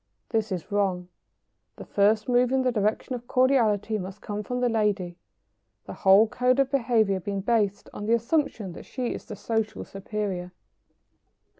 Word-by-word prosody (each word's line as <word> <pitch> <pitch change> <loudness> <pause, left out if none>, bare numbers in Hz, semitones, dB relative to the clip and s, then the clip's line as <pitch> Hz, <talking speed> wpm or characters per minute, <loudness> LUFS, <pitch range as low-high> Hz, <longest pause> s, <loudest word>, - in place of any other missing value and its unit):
This 220 -2 -1
is 185 +2 -4
wrong. 190 -3 0 0.7
The - - -10
first 210 +2 +2
move 245 0 +3
in 265 0 +2
the 255 - +2
direction 215 +3 -1
of 245 -1 -6
cordiality 225 -5 +2
must 190 +2 -7
come 210 0 -4
from 250 +4 -3
the 250 - +2
lady, 210 -6 0 0.7
the - - -7
whole 195 +3 +5
code 250 +2 +1
of 275 -1 +2
behaviour 225 -7 +2
being 200 +2 -3
based 205 -2 0
on 205 - -6
the 230 - +3
assumption 235 - -1
that - - -10
she 250 -2 -3
is - - -8
the 215 - -7
social 220 +1 -2
superior. 195 -3 -4
215 Hz, 165 wpm, -26 LUFS, 200-245 Hz, 0.7 s, whole